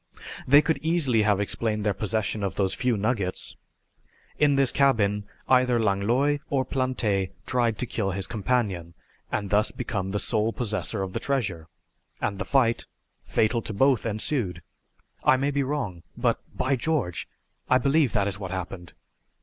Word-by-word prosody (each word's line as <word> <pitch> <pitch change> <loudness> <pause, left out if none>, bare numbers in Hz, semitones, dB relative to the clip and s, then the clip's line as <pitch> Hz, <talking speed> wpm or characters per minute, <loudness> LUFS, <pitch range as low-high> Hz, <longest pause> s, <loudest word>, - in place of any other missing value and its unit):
They 145 +3 +7
could 160 -4 0
easily 155 -8 +2
have 105 -2 +2
explained 105 +1 0
their 105 - +2
possession 110 +1 -2
of 100 -2 -2
those 95 -2 +1
few 125 -3 0
nuggets. 100 -3 -1 0.8
In 145 -2 +4
this 135 -2 +3
cabin 105 -7 +2 0.2
either 125 -2 +4
Langlois 115 +8 +2
or 135 -2 +1
Plante 115 -8 0 0.2
tried 120 -4 +1
to 125 - -2
kill 110 -4 -2
his 95 0 -2
companion, 100 -7 -1 0.4
and 100 -2 -2
thus 105 +1 +4
become 95 -6 -3
the 100 - -1
sole 110 +1 0
possessor 105 -3 -2
of 95 -1 -5
the - - -1
treasure, 95 - -2 0.5
and 100 -2 -2
the - - -2
fight, 120 -4 +2 0.4
fatal 115 +2 +1
to 110 - -5
both, 130 +2 +3
ensued. 105 - -2 0.6
I 130 - +5
may 140 +2 0
be 140 0 0
wrong, 130 - -3 0.2
but - - +1
by 135 +1 0
George, 130 - -1 0.4
I 130 - +6
believe 140 +1 +2
that 100 -1 +2
is 100 -1 -3
what 95 -3 -5
happened!" 90 -1 -6
110 Hz, 160 wpm, -26 LUFS, 100-130 Hz, 0.8 s, They